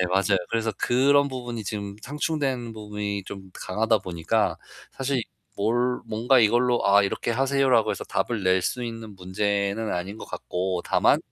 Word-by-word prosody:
네 90 - +2
맞아요. 95 0 +2
그래서 115 -1 0
그런 140 +3 +4
부분이 120 -4 -5
지금 100 -1 -4
상충된 140 -5 -2
부분이 105 -2 -4
좀 95 -1 -9
강하다 110 +3 +1
보니까 85 -4 0 0.4
사실 135 -2 -1 0.3
뭘 120 +4 +1
뭔가 120 +4 +3
이걸로 120 +2 +3
"아 100 +1 +6
이렇게 100 - -2
하세요."라고 135 -2 +3
해서 - - -3
답을 115 -5 -1
낼 95 0 +4
수 125 +5 -2
있는 115 -2 -7
문제는 100 +3 -1
아닌 95 +4 -4
것 - - -8
같고. 90 0 -3
다만 - - +4
110 Hz, 330 characters per minute, -25 LUFS, 100-125 Hz, 0.4 s, 아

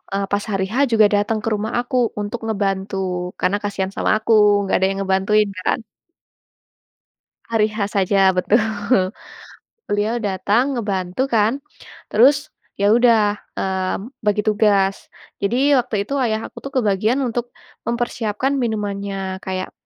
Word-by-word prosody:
eee, 200 0 0
pas 205 0 0
hari 195 -1 0
H - - -3 0.2
juga 220 -1 +5
datang 210 +2 0
ke 225 - 0
rumah 215 +2 -2
aku 245 +1 -4 0.3
untuk 205 +3 -4
ngebantu. 195 -2 -1 0.4
Karena 185 +3 +1
kasihan 195 -2 -2
sama - - +1
aku, 220 +1 -3 0.3
enggak 195 - 0
ada 190 - +3
yang 195 0 -3
ngebantuin 200 +2 +2
kan. - - 0 1.7
Hari 220 -2 +2
H 210 -2 -2
saja, 195 0 +3
betul. 210 +5 +3 1.3
Beliau 210 +3 0
datang 210 +6 0
ngebantu 195 +1 -1
kan. 230 +5 +2 0.5
Terus, 280 +7 +4 0.3
ya 200 +1 +3
udah, 225 -4 +4 0.2
mmm, 190 +4 -2
bagi 210 0 +1
tugas. 205 -2 +2 0.3
Jadi 255 +8 +2
waktu 220 -5 -1
itu 275 - -5
ayah 225 -3 -1
aku - - -10
kebagian 235 +1 +1
untuk 240 0 -2 0.4
mempersiapkan 235 +1 -1
minumannya. 200 -4 -3
Kayak 185 0 -4
210 Hz, 135 wpm, -20 LUFS, 195-230 Hz, 1.7 s, juga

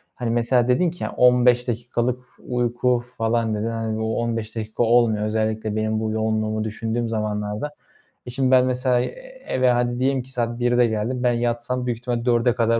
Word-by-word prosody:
hani 120 -2 -3
mesela 120 +1 +2
dedin 165 +7 +2
ki 175 - -8
ya, - - -3
15 125 0 +4
dakikalık 120 +1 -1 0.3
uyku 120 0 0
falan, 115 -1 0
dedin. 105 +2 -2
Hani, 115 -1 -3
bu 110 +1 -1
15 115 -2 -3
dakika 110 +1 -2
olmuyor. 115 -2 +3
Özellikle 110 0 -1
benim 110 0 0
bu 110 0 -2
yoğunluğumu 110 0 -1
düşündüğüm 115 +2 -3
zamanlarda. 105 +4 -3 0.5
E, - - -7
şimdi 130 +1 0
ben, 130 -1 +6
mesela, 125 0 +1
eee, - - -7
eve 130 -1 +2
hadi 120 0 0
diyelim 130 0 +1
ki 130 - -19
saat 120 -2 -2
13.00'de 120 0 +3
geldim. 115 +3 -2
Ben 125 -1 +3
yatsam, 120 +1 -1
büyük 120 -2 -1
ihtimal 120 -1 -3
16.00'ya 120 0 +3
kadar 115 -1 +2
120 Hz, 185 wpm, -22 LUFS, 110-125 Hz, 0.5 s, ben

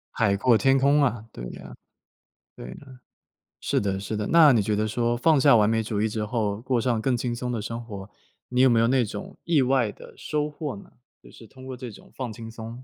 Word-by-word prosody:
海 100 -4 +2
阔 120 +3 +4
天 135 +4 +3
空 140 +2 +3
啊！ 120 -4 -1
对 - - -9
啊。 60 -2 -11 0.8
对 - - -9
啊， 130 -2 -13 0.6
是 - - 0
的 95 -1 -2
是 105 +2 -4
的。 105 - -3
那 160 -4 +7
你 115 -4 +3
觉 105 +1 0
得 110 +1 0
说， 120 +2 0
放 150 +4 +3
下 125 - +6
完 105 -2 +4
美 110 0 +1
主 105 -1 -2
义 110 - +1
之 105 0 -3
后， 105 -2 -2
过 125 -1 -1
上 120 -2 0
更 125 +2 0
轻 120 0 -2
松 125 0 -4
的 115 - -3
生 115 +2 -5
活， 100 -2 -8 0.4
你 125 0 +1
有 130 - +6
没 115 -2 +3
有 115 - +3
那 125 -1 +2
种， 190 - -8
意 165 -4 +2
外 130 -4 +2
的， - - -14
收 150 0 -2
获 150 0 -5
呢？ 200 -2 -14 0.3
就 - - -17
是 115 - -14
通 130 +3 -14
过 130 - -6
这 125 -2 -7
种 - - -16
放 125 -4 -4
轻 115 +1 -9
松。 115 +2 -9
120 Hz, 255 characters per minute, -25 LUFS, 110-130 Hz, 0.8 s, 那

